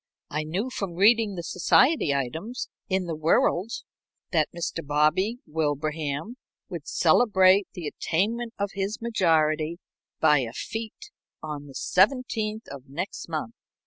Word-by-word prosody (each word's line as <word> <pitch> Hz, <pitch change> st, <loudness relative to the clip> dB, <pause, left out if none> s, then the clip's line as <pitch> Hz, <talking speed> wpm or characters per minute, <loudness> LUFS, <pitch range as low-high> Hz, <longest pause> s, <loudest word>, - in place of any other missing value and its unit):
I 150 Hz, -, -1 dB
knew, 190 Hz, +11 st, -3 dB
from 195 Hz, -8 st, -4 dB
reading 210 Hz, +2 st, +4 dB
the 170 Hz, -, -5 dB
society 250 Hz, -, +3 dB
items 160 Hz, -, -3 dB, 0.2 s
in 190 Hz, -1 st, +1 dB
the 165 Hz, -2 st, -3 dB
Whirald, 170 Hz, +5 st, +2 dB, 0.6 s
that 155 Hz, -5 st, +2 dB
Mr. 165 Hz, -1 st, -4 dB
Bobby 155 Hz, +10 st, +2 dB
Wilbraham 150 Hz, -, -2 dB, 0.3 s
would -, -, -7 dB
celebrate 195 Hz, -4 st, +4 dB
the 175 Hz, -, -6 dB
attainment 225 Hz, +10 st, -1 dB
of 200 Hz, -1 st, -2 dB
his 200 Hz, +2 st, -2 dB
majority 165 Hz, -7 st, +1 dB, 0.4 s
by 150 Hz, -2 st, +5 dB
a 120 Hz, -3 st, -3 dB, 0.2 s
big 225 Hz, 0 st, -2 dB
fête 435 Hz, -1 st, -13 dB, 0.3 s
on 150 Hz, -2 st, -6 dB
the 135 Hz, -, -13 dB
17th 220 Hz, 0 st, +1 dB
of 135 Hz, -1 st, -10 dB
next 170 Hz, +5 st, -5 dB
month. 155 Hz, -8 st, -3 dB
175 Hz, 135 wpm, -26 LUFS, 155-215 Hz, 0.6 s, by